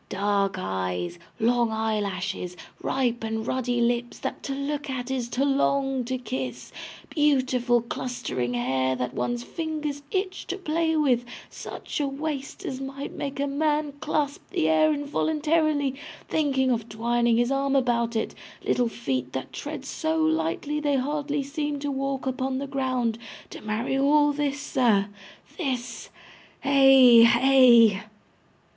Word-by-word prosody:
Dark 200 0 0
eyes, 95 - -3 0.2
long 235 +1 +2
eyelashes, 205 -4 -2 0.2
ripe 245 -3 0
and 220 0 -2
ruddy 245 -1 -1
lips 240 0 0
that - - -5
to 275 - -4
look 285 +1 -3
at 260 -1 -4
is 250 -3 -2
to 265 +3 0
long 275 -1 +1
to 260 +2 -2
kiss, 130 - -5 0.4
beautiful 255 -5 +2
clustering 125 - -3
hair 130 +2 0
that 125 0 -3
one's 240 0 -2
fingers 305 -2 -4
itch 375 0 -2
to 380 - -3
play 320 -2 0
with, 255 -6 +2 0.3
such - - -6
a 290 - +1
waist 280 0 -5
as 265 0 -4
might 275 +1 -6
make 275 0 -5
a 280 - +1
man 295 +1 0
clasp 295 -1 -1
the 160 - 0
air 235 - +4
involuntarily, 300 0 +1 0.3
thinking 270 -4 +1
of 230 -1 -2
twining 235 +1 +1
his 240 +2 +2
arm 275 0 +1
about 235 -3 +1
it, 220 - -1 0.3
little 245 -1 +2
feet 130 - -3
that 130 - -5
tread 290 -2 -6
so 315 +3 -1
lightly 300 - 0
they 290 -2 +1
hardly 290 +2 -1
seem 295 +1 -3
to 285 0 -3
walk 275 0 -2
upon 260 0 -1
the 275 - -3
ground 255 -4 -1 0.3
to - - -9
marry 215 +5 -2
all 290 +1 +4
this, 290 -1 -1
sir, 230 -8 +2 0.5
this 250 -6 -3 0.5
hey, 270 -4 +7
hey! 235 -3 +6
260 Hz, 140 wpm, -26 LUFS, 230-285 Hz, 0.5 s, hey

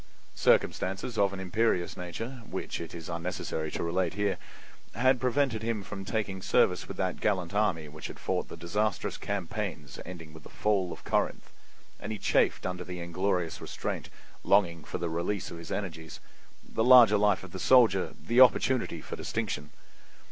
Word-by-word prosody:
Circumstances 95 +6 +1
of 100 -1 +4
an 100 - -6
imperious 95 -1 0
nature, 115 +8 -6
which - - -4
it 85 0 -7
is 85 -2 -8
unnecessary 85 -2 -3
to - - -2
relate 90 +1 0
here, 105 -1 0 0.6
had 130 +1 +3
prevented 130 -3 +1
him 110 -2 -2
from 95 0 -7
taking 100 -4 -2
service 90 -1 +2
with - - -7
that 95 -1 -1
gallant 90 -4 0
army 95 -7 +1
which 75 +1 -8
had - - -9
fought - - -2
the - - -9
disastrous 100 +2 -1
campaigns 90 -7 -4
ending 85 -3 -9
with 80 - -12
the - - -13
fall 100 -4 0
of - - -9
Corinth, - - -1 0.5
and 105 - -5
he 110 - -3
chafed - - +2
under 90 -1 -3
the 90 -1 -7
inglorious 90 0 -1
restraint, - - -4 0.3
longing 85 -5 +3
for - - -5
the 85 - -2
release 85 +4 -2
of 85 - -7
his 85 - -9
energies, 80 -6 -5 0.5
the 110 - -1
larger 120 -4 +8
life 105 -2 +3
of 95 - -10
the 95 - -6
soldier, 110 -3 +4
the 120 +2 +3
opportunity 125 -8 +4
for - - -6
distinction. 75 0 -3
95 Hz, 170 wpm, -29 LUFS, 85-105 Hz, 0.6 s, larger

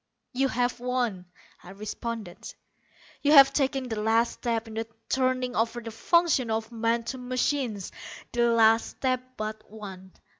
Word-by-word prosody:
"You 270 +2 +2
have 245 -1 -1
won," 245 -7 -1 0.4
I - - -13
responded; 210 0 -6 0.7
"you 290 +1 +4
have 275 -2 +9
taken 270 -2 0
the 220 -3 -3
last 225 +2 +2
step 230 -2 -2
in 220 - -9
the 225 0 -3 0.2
turning 255 -1 0
over 230 +2 0
of 235 - -7
the 225 - -5
functions 300 0 +2
of 220 +1 -2
man 230 0 0
to 260 +3 -5
machines 250 -4 -1 0.4
the 240 0 +2
last 225 0 +5
step 255 -1 0 0.2
but 215 0 -5
one. 190 -3 -10
235 Hz, 155 wpm, -27 LUFS, 220-255 Hz, 0.7 s, have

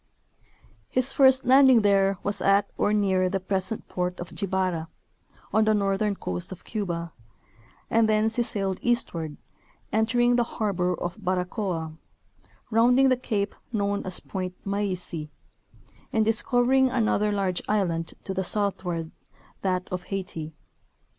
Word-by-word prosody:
His 255 +1 0
first 265 -2 +5
landing 260 -3 +6
there 195 -1 +3
was 205 0 -2
at 200 +1 +3
or - - +1
near 190 -3 +2
the 195 - -1
pres 190 +2 -1
ent 220 - -5
port 180 0 -3
of 175 -1 -7
Jibara, 185 -4 -1 0.7
on 220 0 +4
the 215 0 +3
northern 200 0 0
coast 90 - -4
of 185 -1 -9
Cuba, 170 -6 -4 0.7
and 225 -1 +3
thence 220 +1 +2
he - - +3
sailed 195 -5 -1
eastward, 170 -10 -1 0.6
entering 240 +3 +3
the 240 - +3
harbor 195 -6 -1
of 175 +4 -4
Baracoa, 180 -3 -2 0.7
rounding 245 +4 +5
the 255 - +4
cape 210 -5 -2 0.2
known 200 -2 -1
as 185 -1 0
Point 185 -2 -5
Maisi, 185 -6 -3 0.8
and 220 -4 +2
discovering 245 +4 +3
another 215 -4 +1
large 195 -3 -1
island 170 -6 0
to 190 - -4
the 190 0 -1
southward, 180 -5 -2 0.5
that 185 -1 -1
of 180 -1 -4
Haiti. 165 -5 -5
200 Hz, 135 wpm, -26 LUFS, 180-220 Hz, 0.8 s, landing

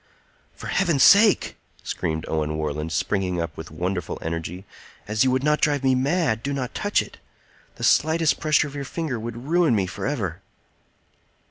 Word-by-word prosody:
"For - - -10
Heaven's 170 -9 +2
sake," 205 - +5 0.3
screamed 80 0 -3
Owen 75 -1 -1
Warland, 75 +1 -3
springing 90 +1 -1
up 85 - -4
with 80 -1 -8
wonderful 90 +2 -3
energy, 85 +3 -5 0.4
"as 110 +3 +2
you 130 - +3
would 130 +1 0
not 150 0 +2
drive 145 -2 +1
me 130 -1 +3
mad, 130 -3 +1
do 140 +3 -3
not 130 -3 -4
touch - - +1
it! - - -15 0.6
The - - -9
slightest 160 0 +3
pressure 155 -2 +3
of 140 - -10
your 140 -1 -4
finger 140 -3 -4
would 120 +2 -7
ruin 165 -4 +3
me 100 -3 +1
forever." 90 -2 -4
120 Hz, 165 wpm, -23 LUFS, -, 0.6 s, sake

